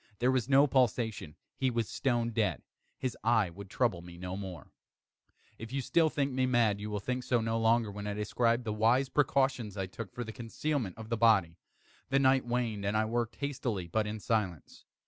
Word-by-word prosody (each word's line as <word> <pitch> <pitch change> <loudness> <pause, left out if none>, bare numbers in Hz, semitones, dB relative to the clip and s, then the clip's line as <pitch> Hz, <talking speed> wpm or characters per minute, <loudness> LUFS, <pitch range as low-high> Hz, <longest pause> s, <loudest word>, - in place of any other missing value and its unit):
There 125 +4 +2
was 130 -1 0
no 140 +1 +6
pulsation. 115 - 0 0.2
He 130 - +1
was 115 -3 -1
stone 120 -3 0
dead. 110 -3 0 0.3
His 130 -2 -3
eve 110 -6 +2
would 100 -1 -9
trouble 110 -6 0
me 85 0 -11
no 90 +1 -5
more. 95 -7 -7 0.9
If 115 - -7 0.2
still 165 -2 +4
you - - 0
think 140 -2 -1
me 130 0 +1
mad, 115 -5 +2
you 105 - -4
will 105 -1 -2
think 125 +5 -3
so 120 -1 +1
no 115 0 -1
longer 115 -1 +2
when 105 +1 -6
I 105 - -2
describe 115 +3 +1
the 110 -2 -2
wise 120 +5 +3
precautions 130 -7 +1
I 95 - -1
took 95 +1 -8
for 120 - -5
the 110 - -7
concealment 120 - -3
of 110 -1 -9
the 115 - 0
body. 95 -7 +3 0.5
The 135 - +3
night 130 -2 +3
waned, 120 -4 -1
and 100 +2 0
I 110 - +2
worked 120 +1 -2
hastily, 125 -9 -3
but 105 +5 0
in 110 +1 -4
silence. 100 -8 -2
115 Hz, 205 wpm, -31 LUFS, 105-125 Hz, 0.9 s, no